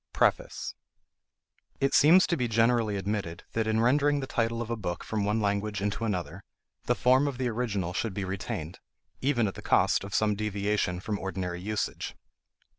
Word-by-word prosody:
PREFACE. - - 0 1.1
It 135 0 +1
seems 175 +6 +7
to 170 - 0
be 125 -6 0
generally 115 -1 +2
admitted 95 -4 -3
that 115 -1 -1
in 110 0 +2
rendering 145 +4 +3
the 135 - -3
title 115 -2 -1
of 120 -1 -4
a - - +1
book 90 -6 -4
from 105 -2 -2
one 105 +2 +1
language 100 0 -1
into 105 +3 -2
another, 90 -8 -3 0.4
the - - +2
form 130 +3 +4
of 140 -3 -3
the 125 -1 0
original 105 -7 -2
should 105 0 -2
be 100 - -2
retained, 95 -3 -5 0.4
even 130 -5 +2
at 95 - -3
the - - -9
cost - - +3
of 100 +1 -5
some 110 -1 +3
deviation 100 -3 -1
from 105 0 -3
ordinary 90 -2 -4
usage. 105 +2 -3
105 Hz, 180 wpm, -28 LUFS, 100-120 Hz, 1.1 s, seems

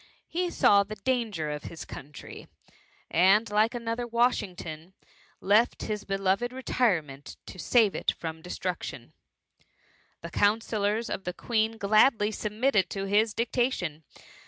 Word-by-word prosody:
He 355 +1 -1
saw 200 -11 +5
the 205 +2 -5
danger 210 -8 -1
of 150 0 -6
his 165 - -8
country, 145 +2 -10 0.6
and 195 +6 +4
like 215 +3 +2
another 235 0 -3
Washington, 190 -8 -1 0.5
left 215 +5 +2
his 210 -1 -4
beloved 195 +4 0
retirement 180 - -1
to 185 - -10
save 220 +2 +3
it - - -1
from 160 -1 -4
destruc 180 +1 -4
tion. - - -8 1.1
The - - -8
counsellors 215 +1 +1
of 195 - -4
the 180 - -4
Queen 225 +2 -1
gladly 215 +1 +3
submitted 215 -2 0
to 195 -1 -4
his 210 +2 +2
dictation. 230 - -1
210 Hz, 130 wpm, -28 LUFS, 185-230 Hz, 1.1 s, saw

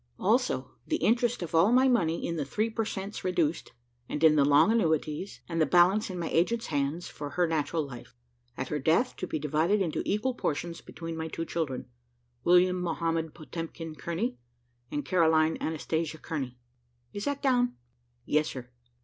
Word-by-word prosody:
"Also, 65 -1 +1 0.2
the - - +1
interest 240 -2 +1
of 170 - -7
all 165 +7 +5
my 255 +2 +5
money 170 -10 +1
in 170 - -2
the 155 - -1
three 215 +11 -1
per 225 0 -1
cents 200 0 -5
reduced, 170 -3 0 0.4
and 150 - -3
in 155 -1 +7
the 145 - +5
long 145 +9 +5
annuities, 160 -3 0
and 165 -1 -1
the - - +5
balance 185 +7 +4
in 185 - -5
my 170 -2 -2
agent's 230 +8 +1
hands, 145 +3 -1
for 145 -1 -6
her 180 +4 +1
natural 160 -1 0
life. 125 -3 -11 0.4
At 130 - -3
her 150 - -1
death 165 - +2
to 185 - -4
be - - -2
divided 155 +7 +1
into 170 -6 -1
equal 235 +6 0
portions 170 -5 -3
between 165 -1 -7
my 160 0 -3
two 165 +1 -4
children, 155 -7 -3 0.6
William 180 +1 +4
Mohamed 165 -2 -1
Potemkin 165 0 -6
Kearney, 170 +10 -3 0.5
and 145 -2 -3
Caroline 160 -1 +3
Anastasia 160 0 -2
Kearney. 135 -7 -5 0.6
Is 205 - -4
that 285 -1 -2
down?" 245 -2 +2 0.5
"Yes, 155 0 +2
sir." 125 -2 -8
165 Hz, 175 wpm, -29 LUFS, 155-190 Hz, 0.6 s, in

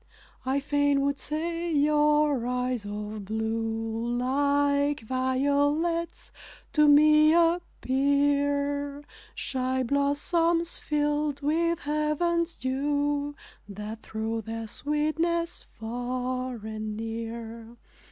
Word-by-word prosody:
I 270 +2 +2
fain 285 0 +2
would 280 0 0
say 335 +3 -3
your 295 -3 +3
eyes 250 -3 -1
of 210 0 -5
blue, 225 +2 -2
Like 285 +2 +1
violets 285 +7 0 0.4
to 300 -1 +5
me 305 +2 +6
appear; 285 -3 +1 0.3
Shy 260 0 -1
blossoms, 325 +6 +1
filled 295 -1 0
with 335 +3 +1
heaven's 315 +3 0
dew, 285 +2 -1 0.3
That 210 +2 -7
throw 220 +1 -3
their 225 +1 -5
sweetness 325 +6 -1
far 250 +2 -3
and 215 -1 -5
near. 230 +1 -6
280 Hz, 85 wpm, -27 LUFS, 235-300 Hz, 0.4 s, me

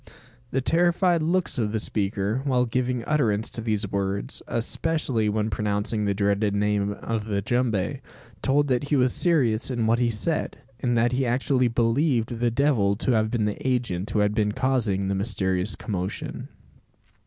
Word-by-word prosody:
The 135 - 0
terrified 175 +3 +2
looks 170 -3 0
of 105 -2 -1
the 110 - 0
speaker, 100 +3 -1
while 125 -3 +2
giving 125 0 -1
utterance 115 -8 +1
to 115 - -5
these 105 -3 -2
words, 100 0 -2
especially 120 -2 -1
when 110 +1 -1
pronouncing 105 +1 -1
the 100 -1 0
dreaded 100 0 +1
name 100 0 +1
of 110 +1 -4
the 105 -2 -1
jumbe 110 -2 -1 0.4
told 145 +2 +2
that 125 +2 +1
he 145 - 0
was 125 -2 +3
serious 135 -11 +2
in 120 -3 -1
what 115 +2 +2
he 120 -1 +2
said; 115 +9 -1 0.2
and 120 -2 0
that 120 +1 +3
he 130 +1 0
actually 125 +1 +1
believed 120 0 +1
the 120 0 +2
devil 115 -6 +2
to 120 - 0
have 110 -2 +2
been 110 -2 0
the 105 +5 -3
agent 115 -7 -1
who 105 - 0
had 105 0 +2
been 105 -1 +1
causing 110 -8 0
the 100 - 0
mysterious 95 -2 0
commotion! 95 -4 -4
115 Hz, 170 wpm, -25 LUFS, 105-130 Hz, 0.4 s, was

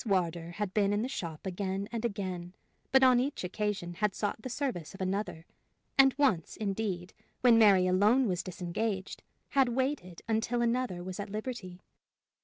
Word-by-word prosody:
Wardour 175 -5 0
had 205 0 -3
been 205 -1 +2
in 205 +2 +1
the - - -1
shop 170 - -5
again 190 +1 -2
and 230 -1 -3
again, 185 -5 -3 0.4
but 265 0 +6
on 255 -2 +6
each 275 -2 -2
occasion 190 -2 -2
had 205 +2 0
sought 205 +1 -2
the 255 - -5
service 240 - -3
of 195 - -9
another; 190 -3 -2 0.5
and 270 -1 +6
once, 240 - +1
indeed, 195 -4 -2 0.3
when 235 -2 +6
Mary 195 -4 +6
alone 210 +8 +4
was 180 -3 0
disengaged, 190 +3 -3 0.3
had 270 -3 +3
waited 240 - -2
until 230 +2 +1
another 235 -7 0
was 185 +1 -6
at 205 - -4
liberty. 210 -4 -5
205 Hz, 165 wpm, -31 LUFS, 185-235 Hz, 0.5 s, but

